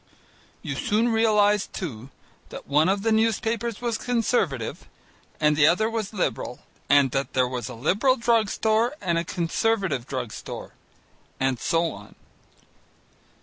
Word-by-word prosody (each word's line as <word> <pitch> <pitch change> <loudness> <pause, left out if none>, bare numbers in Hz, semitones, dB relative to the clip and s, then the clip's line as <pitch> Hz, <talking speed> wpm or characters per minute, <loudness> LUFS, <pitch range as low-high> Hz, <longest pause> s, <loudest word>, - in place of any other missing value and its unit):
You - - -3
soon 230 +1 +1
realized 210 -3 +2
too 130 - -6 0.4
that - - -9
one 150 +5 +3
of 195 +1 0
the 225 - +2
newspapers 225 +1 0
was 235 -2 -1
Conservative 225 - -1 0.5
and 150 -1 +3
the 150 0 +5
other 215 +7 +2
was 220 -3 -3
Liberal, 135 - -3 0.3
and 140 -2 +5
that 135 0 -2
there 130 -1 +2
was 125 -1 -4
a 125 - -7
Liberal 205 - +2
drug 230 -3 +2
store 225 +6 +1
and 170 -4 0
a - - -1
Conservative 175 - -1
drug 125 -4 -4
store, - - -8 0.7
and 130 -2 0
so 165 +3 +1
on. 105 +1 -12
190 Hz, 145 wpm, -25 LUFS, 140-225 Hz, 0.7 s, the